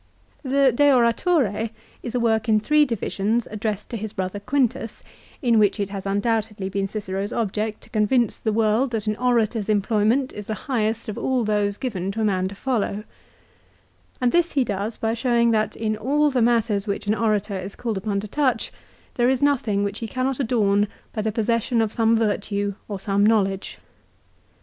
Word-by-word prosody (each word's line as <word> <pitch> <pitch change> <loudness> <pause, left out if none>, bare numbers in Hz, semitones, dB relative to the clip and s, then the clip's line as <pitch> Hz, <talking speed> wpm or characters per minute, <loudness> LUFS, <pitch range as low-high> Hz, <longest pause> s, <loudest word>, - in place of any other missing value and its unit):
The 275 -1 +3
" - - -6
De 290 +2 +5
Oratore 235 - +2 0.2
" - - -29
is 240 0 -6
a - - +2
work 225 -1 +1
in 215 -1 +5
three 300 +7 +4
divisions 225 -1 -1
addressed 215 -1 -3
to 235 - -3
his 215 0 -5
brother 190 +1 -3
Quintus 255 0 -1 0.4
in 235 -3 +4
which 205 0 +3
it 200 -1 -2
has 195 -1 -5
undoubtedly 210 -1 -1
been 195 0 -1
Cicero's 200 0 -4
object 215 -1 -2
to - - -16
convince 220 +1 +1
the 220 - -1
world 220 +4 +2
that 220 -2 -2
an 215 0 0
orator's 230 -4 +1
employ 210 0 +1
ment 260 +4 +2
is 210 -1 -8
the 220 - -2
highest 225 -4 -1
of 215 - -4
all 255 -2 0
those 205 -1 0
given 195 -8 -3
to 225 - -3
a - - +2
man 185 -2 +1
to 200 - -8
follow; 215 -3 -1 1.2
and 250 -1 +2
this 345 0 +2
he 275 - +3
does 205 0 -3
by 225 0 -1
showing 235 -1 +2
that 215 -1 0
in 215 -1 -1
all 290 +7 +1
the 255 -2 +1
matters 225 -3 +2
which 200 - -3
an 205 - +2
orator 215 -2 0
is 190 +1 -6
called 230 -3 -3
upon 200 0 -1
to 215 - -7
touch 255 -1 0 0.4
there 240 0 +2
is 265 +1 +1
nothing 240 -8 +2
which 200 +1 -3
he 230 - -4
cannot 255 +3 -2
adorn 210 -5 +2 0.3
by 215 - -2
the 220 +1 -1
possession 230 +2 0
of 220 -1 0
some 225 0 +3
virtue 205 -2 -1
or 200 -2 -5
some 200 0 +1
knowledge. 195 -3 +1
220 Hz, 195 wpm, -23 LUFS, 205-240 Hz, 1.2 s, De